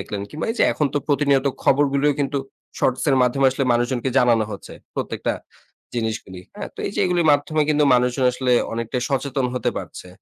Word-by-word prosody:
দেখলেন। 100 Hz, +1 st, -5 dB
কিংবা 155 Hz, -, -5 dB
এই 225 Hz, -, -2 dB
যে -, -, +5 dB
এখন 150 Hz, -, 0 dB
তো -, -, +3 dB
প্রতিনিয়ত 140 Hz, -1 st, +2 dB, 0.2 s
খবরগুলোও 140 Hz, +1 st, +3 dB
কিন্তু 140 Hz, 0 st, 0 dB, 0.4 s
শর্টস 130 Hz, -, +1 dB
এর 135 Hz, -, +3 dB
মাধ্যমে 135 Hz, +2 st, +2 dB
আসলে 135 Hz, +1 st, -1 dB
মানুষজনকে 120 Hz, +2 st, 0 dB
জানানো 120 Hz, -3 st, +3 dB
হচ্ছে 100 Hz, -, -9 dB, 0.2 s
প্রত্যেকটা -, -, -2 dB, 0.6 s
জিনিসগুলি, 110 Hz, -5 st, -4 dB, 0.2 s
হ্যাঁ? -, -, -5 dB
তো -, -, -26 dB
এই 200 Hz, -, -4 dB
যে -, -, 0 dB
এগুলির 175 Hz, -2 st, +1 dB
মাধ্যমে 150 Hz, +2 st, +1 dB
কিন্তু 150 Hz, -1 st, +3 dB
মানুষজন 125 Hz, +1 st, +1 dB
আসলে 125 Hz, 0 st, 0 dB, 0.2 s
অনেকটাই 115 Hz, +2 st, -3 dB
সচেতন 135 Hz, -1 st, 0 dB
হতে 125 Hz, -, 0 dB
পারছে। 90 Hz, -, -9 dB
135 Hz, 180 wpm, -22 LUFS, 120-145 Hz, 0.6 s, যে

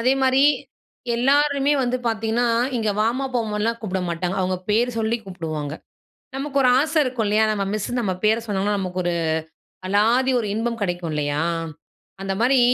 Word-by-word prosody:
அதே 255 Hz, +3 st, +3 dB
மாரி, 260 Hz, 0 st, +3 dB, 0.8 s
எல்லாருமே 280 Hz, +3 st, +3 dB
வந்து 250 Hz, 0 st, 0 dB
பாத்தீங்கன்னா, 225 Hz, +1 st, 0 dB, 0.3 s
இங்கே 220 Hz, -3 st, 0 dB
வாமா, 235 Hz, +5 st, +1 dB
போமான்னுலாம் 225 Hz, 0 st, -1 dB
கூப்பிட 190 Hz, -3 st, -2 dB
மாட்டாங்க. 175 Hz, +2 st, -2 dB
அவங்க 185 Hz, 0 st, 0 dB
பேரு 235 Hz, +4 st, +2 dB
சொல்லி 225 Hz, +1 st, +1 dB
கூப்புடுவாங்க. 160 Hz, -6 st, -5 dB, 0.6 s
நமக்கு 280 Hz, +1 st, -1 dB
ஒரு 255 Hz, -, +5 dB
ஆசை 310 Hz, +3 st, 0 dB
இருக்கும் 250 Hz, -4 st, -2 dB
இல்லையா? 215 Hz, +2 st, +3 dB
நம்ம 205 Hz, -2 st, -1 dB
மிஸ் 215 Hz, -1 st, -2 dB
நம்ம 190 Hz, -4 st, 0 dB
பேர 220 Hz, +1 st, +4 dB
சொன்னோம்னா 205 Hz, 0 st, 0 dB
நமக்கு 185 Hz, -1 st, -3 dB
ஒரு 175 Hz, -, 0 dB, 0.7 s
அலாதி 230 Hz, +7 st, +3 dB
ஒரு 220 Hz, -, -2 dB
இன்பம் 230 Hz, 0 st, -2 dB
கிடைக்கும், 175 Hz, -3 st, -2 dB
இல்லையா? 150 Hz, +1 st, -1 dB, 0.8 s
அந்த 195 Hz, 0 st, -2 dB
மாரி 255 Hz, +2 st, +4 dB
220 Hz, 155 wpm, -22 LUFS, 190-245 Hz, 0.8 s, ஒரு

